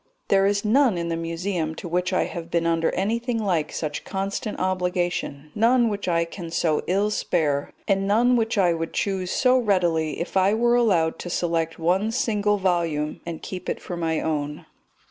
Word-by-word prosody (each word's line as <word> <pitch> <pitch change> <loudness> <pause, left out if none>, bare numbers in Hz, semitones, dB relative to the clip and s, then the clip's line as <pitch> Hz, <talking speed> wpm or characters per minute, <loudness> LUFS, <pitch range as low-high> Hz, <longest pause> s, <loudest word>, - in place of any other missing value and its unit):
There 195 0 +4
is 200 +1 0
none 240 -2 +4
in 170 0 -2
the 165 - -1
Museum 165 0 -3
to 175 - -7
which 180 +2 0
I 185 - +2
have 170 -1 -6
been 170 -1 0
under 165 -1 +2
anything 230 +5 -1
like 180 -8 0
such 150 -2 -4
constant 195 +2 -3
obligation, 180 -5 -2
none 235 +2 +3
which 200 -2 -4
I 170 -1 +2
can 170 0 -8
so 160 -2 +1
ill 200 +3 +1
spare, 150 -8 0 0.2
and 195 -1 +1
none 240 +5 +4
which 225 -2 0
I 180 -3 +4
would 165 0 -4
choose 190 -2 -1
so 255 +4 +3
readily 175 -8 +1
if 170 - -5
I 190 +2 +4
were 240 +1 +3
allowed 190 -10 +2
to 175 - -6
select 165 -2 -1
one 185 +6 +1
single 210 -4 +1
volume 170 -5 -1
and 165 -2 -6
keep 185 -1 -6
it - - -2
for 180 - -6
my 165 -2 -1
own. 150 -2 -3
180 Hz, 185 wpm, -24 LUFS, 165-205 Hz, 0.2 s, There